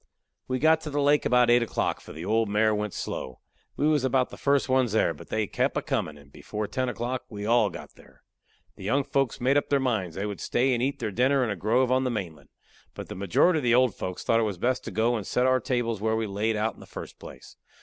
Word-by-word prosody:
We 130 - -1
got 160 +3 +4
to 155 - -6
the 145 0 -2
lake 145 +1 +3
about 125 -1 +4
eight 120 0 +5
o'clock, 115 - -1
for - - -12
the 80 +3 -7
old 110 +1 +1
mare 110 +1 +2
went 105 -1 -3
slow. 65 - -5 0.4
We 150 - +2
was 150 -3 +2
about 130 -1 +1
the - - -8
first 140 -2 +1
ones 130 -4 +2
there, 110 -6 +2
but 75 - -13
they 110 -1 0
kep' - - -1
a - - 0
comin', 75 -1 -2
and 70 -1 -18
before 105 +7 -5
ten 130 +4 -2
o'clock 120 +2 -4
we 105 -2 -6
all 115 -2 +3
got - - -10
there. - - -21 0.5
The - - -10
young 135 +8 +1
folks 135 -2 -1
made 130 +3 +2
up 145 - 0
their 140 - +3
minds 110 -11 -1
they 100 - -3
would 105 -2 -5
stay 130 +2 +1
and 120 - -1
eat 135 +2 0
their 110 -4 -3
dinner 130 +5 +2
in 115 - -1
a - - -2
grove 120 +7 +1
on 130 +1 +3
the 130 - 0
mainland. 95 -9 -5 0.5
But - - -8
the - - -6
majority 100 - +2
of - - -6
the 120 -1 +4
old 125 -3 +4
folks 90 -1 -5
thought 115 - +2
it - - +2
was 105 -4 -1
best 125 +7 0
to - - -4
go 115 +4 +1
and 105 -4 -4
set 125 - +1
our 130 0 +3
tables 115 -3 -2
where 110 +1 +1
we 110 0 -1
laid 105 +2 -1
out 105 +1 +1
to - - -11
in - - -16
the - - -13
first - - -9
place. - - -12
120 Hz, 270 wpm, -26 LUFS, 105-130 Hz, 0.5 s, eight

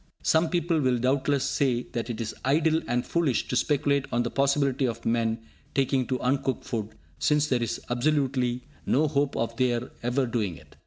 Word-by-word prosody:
Some 160 +1 +3
people 170 -2 +1
will 130 -2 +2
doubtless 135 +2 +1
say 125 -3 +1
that 115 -1 -3
it 115 -2 -4
is 115 -2 -3
idle 155 +4 +2
and 120 0 0
foolish 160 -8 0
to - - -1
speculate 140 0 +1
on 120 0 +1
the 120 - -3
possibility 140 -1 +2
of 115 -1 -5
men 115 -1 +1 0.4
taking 135 -2 +1
to 130 -1 -1
uncooked 135 +1 0
food, 110 -3 -4 0.2
since 150 -1 +3
there 125 -5 0
is 115 - -2
absolutely 125 -1 0 0.2
no 155 +4 +3
hope 145 -1 0
of 115 0 -1
their 125 -1 0
ever 125 +3 +1
doing 110 -8 -2
it. - - -18
130 Hz, 180 wpm, -27 LUFS, 120-140 Hz, 0.4 s, Some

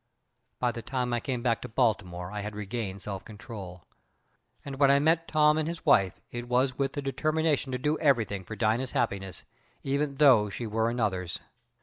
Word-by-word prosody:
"By 125 -1 +1
the 115 - -6
time 125 -1 -2
I 120 - +1
came 125 -1 -3
back 115 -3 +1
to 125 - -7
Baltimore 95 -7 0
I 105 0 -4
had 105 +1 -6
regained 100 -2 -4
self 100 -1 -5
control, 105 -5 -9 0.8
and 135 -1 -6
when 140 -1 +6
I 140 - +6
met 160 +3 +2
Tom 150 0 +4
and 155 - -1
his 170 0 -5
wife 100 - +4
it 120 0 -5
was 130 +1 +2
with 135 0 -1
the 145 - -4
determination 155 0 0
to 125 - -1
do 150 +5 0
everything 115 -10 +2
for 110 +4 -7
Dina's 115 +4 0
happiness, 95 -5 -2 0.4
even 140 +1 -1
though 130 -8 +6
she 115 +4 -5
were 110 +1 0
another's. 100 -7 -1
120 Hz, 190 wpm, -28 LUFS, 105-140 Hz, 0.8 s, when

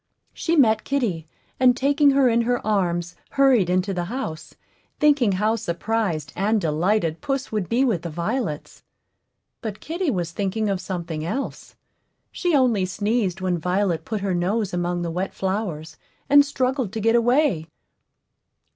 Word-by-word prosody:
She 335 - -1
met 220 -7 +4
kitty, 210 - -1 0.3
and 250 -1 +5
taking 285 +1 +3
her 275 -1 +4
in 235 -1 +3
her 245 +1 -1
arms, 175 -4 0 0.2
hurried 260 -9 +4
into 185 +2 +1
the 175 -1 -2
house, 175 -8 -6 0.4
thinking 280 -9 +4
how 210 +4 +1
surprised 175 -5 -2
and 210 +4 +1
delighted 165 0 0
puss 275 -1 -2
would 210 -5 -2
be 250 +4 +2
with 215 -10 0
the 170 - -5
violets. 170 - -3 0.8
But 215 -3 -5
kitty 340 +1 -2
was 175 -8 -2
thinking 205 +4 -1
of 195 -2 -1
something 170 -4 -4
else; 260 +12 -5 0.6
she 350 -4 0
only 245 -8 +3
sneezed 205 0 -1
when 180 -2 0
Violet 180 0 0
put 215 -2 -4
her 195 -2 -1
nose 190 +3 -1
among 175 0 -1
the 170 - -3
wet 185 +3 -3
flowers, 190 -5 -3 0.3
and 285 0 +8
struggled 260 -5 -1
to 225 - -3
get 225 +2 +2
away. 240 - +2
205 Hz, 155 wpm, -23 LUFS, 175-245 Hz, 0.8 s, and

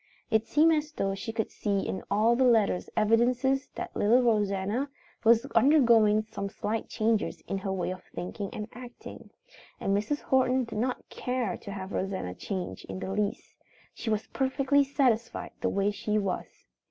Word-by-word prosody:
It 220 0 +2
seemed 320 +2 +5
as 305 0 -1
though 195 -8 -1
she 225 +4 -5
could 225 -1 -2
see 200 -2 -1
in 190 - -3
all 220 +3 +3
the 260 - +3
letters 225 -7 +3
evidences 245 +5 +2
that - - -6
little 240 +5 +4
Rosanna 210 +3 +1 0.3
was 230 +2 +5
undergoing 230 -7 +5
some 200 -2 -4
slight 220 +2 -3
changes 220 -1 0
in 195 - -4
her 195 0 -3
way 185 -1 -1
of 185 - -7
thinking 195 +2 -5
and 210 -1 -5
acting. 245 0 -10 0.5
And 195 - +1
Mrs. 215 +9 -1
Horton 260 0 +2
did 220 -3 -5
not 250 +2 -2
care 250 -1 -2
to 200 - -9
have 190 -1 -6
Rosanna 190 - -2
change 185 - -5
in - - -6
the 190 - -4
least. 205 +1 -3 0.4
She 235 - -5
was 215 -1 0
perfectly 275 +1 +2
satisfied 255 -4 0
the - - +1
way 200 +1 +1
she 210 +1 -1
was. 195 -3 -1
220 Hz, 170 wpm, -28 LUFS, 200-250 Hz, 0.5 s, seemed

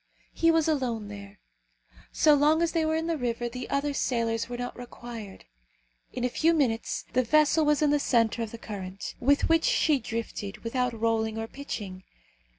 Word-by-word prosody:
He 330 - +3
was 325 -1 +3
alone 245 -9 -1
there. 200 0 -10 0.7
So 305 - +5
long 300 +3 +4
as 335 - +1
they 330 -2 +1
were 315 0 +1
in 320 0 -1
the 330 -2 -1
river 240 -1 -1
the 250 +1 -6
other 280 +1 0
sailors 230 -4 -1
were 245 - -4
not 245 0 -5
required. 235 -4 -9 0.7
In 245 - -4
a - - +3
few 325 +7 +2
minutes 240 -7 0
the 255 - +4
vessel 305 +4 +3
was 300 0 +3
in 295 - +3
the 295 - +3
centre 235 -4 +2
of 225 - -2
the 230 - -8
current, 195 -3 -7
with 285 +3 +3
which 330 0 +3
she 320 - +3
drifted 225 -3 -5
without 245 0 -1
rolling 220 -1 0
or 225 - -2
pitching. 205 -8 -7
245 Hz, 185 wpm, -27 LUFS, 225-300 Hz, 0.7 s, So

